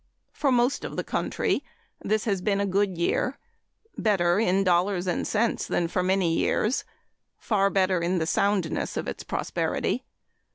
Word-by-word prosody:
For 280 -3 0
most 245 +2 +2
of - - -6
the - - -1
country - - -1 0.4
this 215 0 0
has 200 -5 0
been 200 +1 +1
a 200 - +1
good 195 -1 0
year 250 +10 0 0.6
better 185 -4 +2
in 195 -3 +2
dollars 180 0 +2
and 180 -2 -1
cents 225 +1 0
than 170 - 0
for 180 - -1
many 185 -2 +2
years 215 +8 +1 0.5
far 200 -3 +1
better 185 -2 +2
in 175 +2 0
the 160 - 0
soundness 190 -1 0
of - - -3
its - - -5
prosperity. - - -2
195 Hz, 160 wpm, -26 LUFS, 180-210 Hz, 0.6 s, most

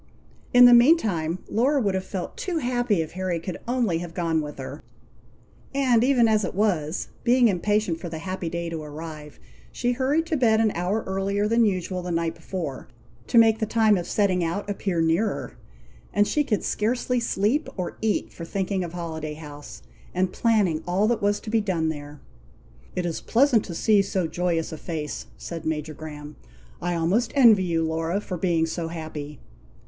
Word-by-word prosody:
In 245 0 +8
the 245 - +9
meantime, 220 - +4
Laura 270 +6 +2
would 200 -6 +1
have 190 0 -1
felt 190 -1 -5
too 360 -3 -3
happy 245 - +1
if 155 - -10
Harry 185 -2 -2
could 180 +1 -6
only 235 -9 +1
have 170 -1 -7
gone 165 -3 0
with 150 -1 -7
her; 140 +2 -7 0.9
and 250 -4 +3
even 250 -3 +4
as 215 -1 +2
it 185 - -3
was, 180 -6 0
being 245 0 +5
impatient 205 -2 0
for 175 - -6
the 160 - -5
happy 185 0 -4
day 170 0 -3
to 165 -1 -4
arrive, 150 0 -9 0.3
she 245 0 -1
hurried 275 +6 +1
to 330 -1 -1
bed 225 -4 +3
an 220 -1 +3
hour 185 +6 -1
earlier 195 +2 0
than 230 +1 +3
usual 185 -2 -1
the 180 - -5
night 165 -1 0
before, 165 -6 -6 0.4
to - - +2
make 225 -1 +6
the 220 - -1
time 220 -1 +4
of 175 -2 -3
setting 190 -4 +1
out 170 +5 -2
appear 195 -4 -1
nearer; 165 +7 0 0.6
and 205 0 +4
she 300 - +1
could 220 -8 -1
scarcely 245 +3 0
sleep 230 +6 0
or 180 - -3
eat 220 -1 -1
for 170 - -8
thinking 190 +2 -2
of 170 -1 -6
Holiday 160 -3 -5
House, 145 -2 -10 0.3
and 185 0 0
planning 205 -9 +2
all 190 +4 +2
that 235 -1 0
was 205 0 +1
to 215 - -7
be 225 -1 +3
done 170 -6 0
there. 145 -1 -7 0.8
"It 180 - -1
is 170 -2 -3
pleasant 240 -2 +3
to 170 - -6
see 210 +3 +4
so 190 -2 -1
joyous 170 0 -1
a 160 - -7
face," 155 -4 -5
said 165 -2 -7
Major 155 -1 -3
Graham. 150 -1 -9 0.4
"I 175 0 -1
almost 195 +9 +1
envy 225 -8 +6
you, 165 -2 0
Laura, 165 +4 -1
for 185 -3 -5
being 170 -2 +1
so 165 0 -3
happy." 155 -3 -7
185 Hz, 185 wpm, -25 LUFS, 165-220 Hz, 0.9 s, the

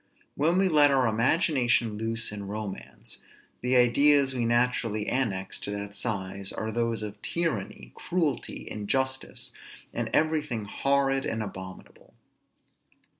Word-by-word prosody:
When 165 +5 +2
we 190 0 +4
let 150 -4 +6
our 135 -2 +3
imagination 120 - +2
loose 115 +1 -2
in 100 -1 -6
romance, 105 -1 -6 0.4
the 125 +1 +1
ideas 135 +3 +5
we 120 -2 -1
naturally 120 -3 +1
annex 100 -8 -1
to - - -5
that 100 0 -4
size 100 -3 -3
are 110 0 -3
those 115 -1 -1
of 105 0 -7
tyranny, 110 - -2
cruelty, 160 -7 -2
injustice, 130 +6 -2 0.4
and - - -2
everything 150 -8 +1
horrid 135 +4 +1
and 115 -3 -2
abominable. 95 -2 -10
120 Hz, 125 wpm, -28 LUFS, 105-140 Hz, 0.4 s, let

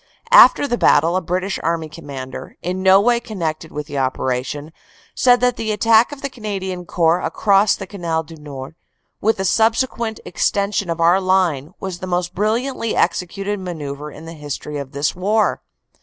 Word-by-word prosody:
After - - +7
the 240 -3 -1
battle, 165 +4 +4
a 185 - +1
British 185 +3 -2
Army 165 -1 -1
Commander, 140 -5 -8
in 185 +2 -2
no 190 +1 +6
way 235 +3 +3
connected 165 -8 -4
with 150 0 -5
the 145 -2 -4
operation, 130 +3 -2 0.4
said 245 -1 +4
that 250 -1 +2
the 220 -1 -2
attack 225 +3 +4
of 290 -1 -9
the - - 0
Canadian 190 -6 -5
Corps 170 0 +2
across 200 0 +3
the 195 - -7
Canal 170 -5 -3
du 165 +1 -12
Nord, 145 -2 -9 0.5
with 220 +2 +2
the 190 - -2
subsequent 225 +2 +1
extension 200 -2 0
of 165 0 -2
our 175 +3 +4
line, 180 -5 +1
was 190 -2 -5
the 185 - -6
most 180 0 -1
brilliantly 230 +4 -1
executed 195 +4 -1
manoeuvre 150 -5 -6
in 155 +3 -11
the 165 - -8
history 150 -1 -6
of 135 -1 -7
this 140 +2 -1
war. 210 +4 +1
180 Hz, 170 wpm, -20 LUFS, 155-210 Hz, 0.5 s, After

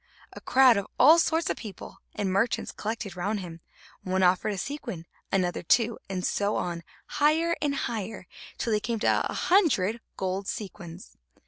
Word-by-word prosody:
A - - -10
crowd 255 -3 +5
of 200 - -2
all 325 +2 +8
sorts 325 0 +1
of - - -4
people 205 -6 -9 0.2
and 195 -2 -1
merchants 200 +5 0
collected 215 -3 -5
round 200 +4 -2
him; 170 -2 -9 0.4
one 190 0 0
offered 185 +3 +3
a - - -5
sequin, 235 - -5 0.3
another 185 -2 0
two, 230 +6 +2
and 185 -2 -3
so 205 +1 0
on, 170 -1 -3 0.2
higher 320 +3 +2
and 290 -1 0
higher, 220 -6 -4 0.3
till 230 - -1
they 210 - +2
came 230 +2 -2
to - - +3
a - - -4
hundred 240 - +2 0.2
gold 190 +1 -2
sequins. 185 -4 -7
205 Hz, 165 wpm, -27 LUFS, 185-245 Hz, 0.4 s, all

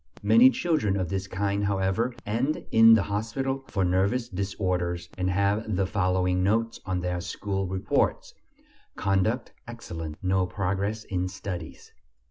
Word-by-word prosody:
Many 245 +3 +7
children 160 - 0
of 90 -3 -2
this 95 +1 -3
kind, 100 +1 -1
however, 100 +5 0
end 120 +8 -1
in 115 0 +8
the 105 - +2
hospital 135 +6 -2
for 95 -2 0
nervous 100 +7 +1
disorders 90 -3 -2
and 90 0 -1
have 100 +3 0
the 95 +1 +1
following 90 -2 +1
notes 115 +4 +1
on 90 -1 -1
their 90 0 -2
school 95 +1 -3
reports: 95 +1 0 0.6
"Conduct 100 +5 0
excellent; 80 -10 -7
no 95 0 +1
progress 100 +3 -2
in 90 -3 -2
studies." 90 -3 -7
95 Hz, 135 wpm, -27 LUFS, 90-110 Hz, 0.6 s, in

